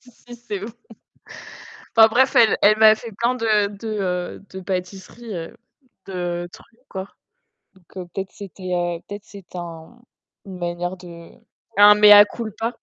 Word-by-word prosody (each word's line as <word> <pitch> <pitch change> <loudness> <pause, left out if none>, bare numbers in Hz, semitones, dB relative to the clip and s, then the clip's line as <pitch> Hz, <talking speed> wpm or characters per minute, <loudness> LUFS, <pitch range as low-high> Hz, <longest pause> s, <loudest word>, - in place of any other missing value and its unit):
Si, 250 - -19
si, 240 0 -15
c'est 210 -5 -7
ouf, 230 - -8 1.2
enfin 225 -1 +8
bref, 255 +4 +2
elle 225 -2 +5
elle 215 +1 +5
m'a 220 0 +7
fait 230 +1 -10
plein 240 +2 0
de 215 -4 +1
de, 225 - -8
heu, 185 -3 -3
de 190 - -6
pâtisseries, 190 +4 -6
heu, 165 -1 -8 0.5
de 175 -2 -4
trucs, 230 0 -18
quoi. 190 0 -7 0.7
Donc 180 0 -11
peut-être 195 -1 -5
c'était 190 -2 -8 0.3
peut-être 205 0 -8
c'est 195 -3 -14
un 170 +6 -9 0.5
une 190 -2 -9
manière 175 +1 -4
de 170 -2 -13 0.5
un 205 0 +8
mea 210 0 +8
culpa. 225 +2 -5
200 Hz, 150 wpm, -21 LUFS, 180-220 Hz, 1.2 s, enfin